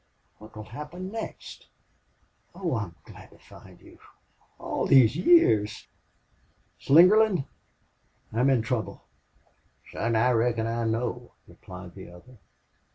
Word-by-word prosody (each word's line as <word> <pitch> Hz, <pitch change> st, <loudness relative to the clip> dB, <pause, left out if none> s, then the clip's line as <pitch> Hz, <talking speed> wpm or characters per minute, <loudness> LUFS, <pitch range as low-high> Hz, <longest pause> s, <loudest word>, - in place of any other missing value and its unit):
What 110 Hz, 0 st, -15 dB
will 110 Hz, -, -8 dB
happen 150 Hz, -, -9 dB
next?... 225 Hz, 0 st, -8 dB, 0.9 s
Oh, 175 Hz, -7 st, -3 dB
I'm 100 Hz, -7 st, -5 dB
glad -, -, -14 dB
to -, -, -20 dB
find -, -, -17 dB
you!... -, -, -18 dB, 0.6 s
All -, -, -3 dB
these 130 Hz, -2 st, +5 dB
years! 115 Hz, -, +3 dB, 0.9 s
Slingerland, 185 Hz, +2 st, +4 dB, 0.9 s
I'm 125 Hz, +4 st, +2 dB
in 125 Hz, -4 st, +2 dB
trouble!" 115 Hz, -4 st, -4 dB, 0.9 s
"Son, 115 Hz, 0 st, -2 dB
I 120 Hz, +3 st, +3 dB
reckon 115 Hz, -1 st, 0 dB
I 115 Hz, 0 st, -2 dB
know," 120 Hz, +2 st, -3 dB
replied 90 Hz, -1 st, -12 dB
the 95 Hz, -2 st, -12 dB
other. 100 Hz, +8 st, -17 dB
120 Hz, 115 wpm, -26 LUFS, 110-150 Hz, 0.9 s, these